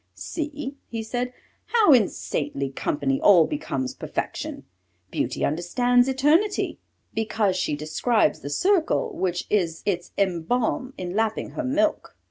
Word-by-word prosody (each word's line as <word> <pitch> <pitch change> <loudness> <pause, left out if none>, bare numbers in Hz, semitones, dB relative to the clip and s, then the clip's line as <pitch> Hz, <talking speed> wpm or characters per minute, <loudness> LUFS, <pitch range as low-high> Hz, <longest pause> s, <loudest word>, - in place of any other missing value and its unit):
"See," 295 -3 -5
he 225 -1 -4
said, 245 +3 -2 0.3
"how 440 -10 +5
in 230 -7 +5
saintly 140 -2 -3
company 135 0 -1
all 180 -6 +7
becomes 135 - -3
perfection: - - -4 0.5
Beauty 125 - -1
understands 245 - +2
eternity, 300 +10 +2 0.3
because 215 -3 0
she 180 -5 0
describes 155 +10 +1
the 145 - -6
circle 385 - +1
which 180 - -1
is 170 -6 0
its 180 -3 -1
emblem 210 +8 0
in 180 -1 -4
lapping 220 0 0
her - - -4
milk." 305 +4 0
220 Hz, 125 wpm, -25 LUFS, 170-275 Hz, 0.5 s, all